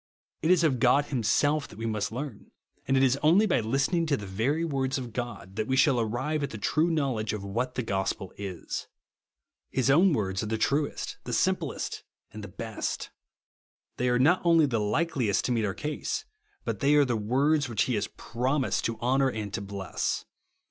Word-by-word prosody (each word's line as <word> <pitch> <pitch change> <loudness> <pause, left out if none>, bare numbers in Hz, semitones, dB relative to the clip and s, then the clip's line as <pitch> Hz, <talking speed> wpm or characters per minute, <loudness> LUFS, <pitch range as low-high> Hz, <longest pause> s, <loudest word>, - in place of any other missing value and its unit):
It 160 - +1
is 180 -2 +5
of 135 -6 +2
God 140 +4 +4
himself 140 +4 +1
that - - -14
we 115 - -4
must 110 -2 -1
learn; 125 -2 -6 0.4
and 135 +1 +3
it 130 - +4
is 130 +1 +3
only 170 +8 +5
by - - +2
listening 135 - +1
to 145 -2 +2
the 105 - -7
very 125 +12 0
words 135 -3 -1
of 125 -4 -6
God 105 -6 -5
that 110 0 -1
we 130 - +1
shall 130 -1 +4
arrive 130 +7 -1
at 140 - -1
the 110 - -7
true 155 - +1
knowledge 135 -10 0
of 105 -2 -4
what 120 +6 -2
the 125 - -1
gospel 95 -2 -2
is. 95 -4 -5 0.8
His 130 0 +2
own 175 +7 +5
words 95 -8 0
are 105 - -3
the 110 +1 -1
truest, 140 +6 -1
the - - -4
simplest, - - -1 0.3
and 105 0 -8
the - - -6
best. 110 +3 -4 0.9
They 125 0 +1
are 125 - +3
not 160 +9 +4
only 165 -2 +5
the 120 -5 0
likeliest 115 - 0
to - - 0
meet 115 -3 +1
our 95 - -2
case; 150 0 -3 0.4
but - - -2
they 145 0 +4
are 145 -1 +6
the 120 -2 0
words 135 +6 +1
which 110 -4 +1
he 125 - -1
has 105 - 0
promised 130 +3 -1
to 115 -1 -2
honour 135 +2 +3
and 105 -4 -5
to 110 - -2
bless. 100 -1 -3
125 Hz, 200 wpm, -28 LUFS, 110-145 Hz, 0.9 s, are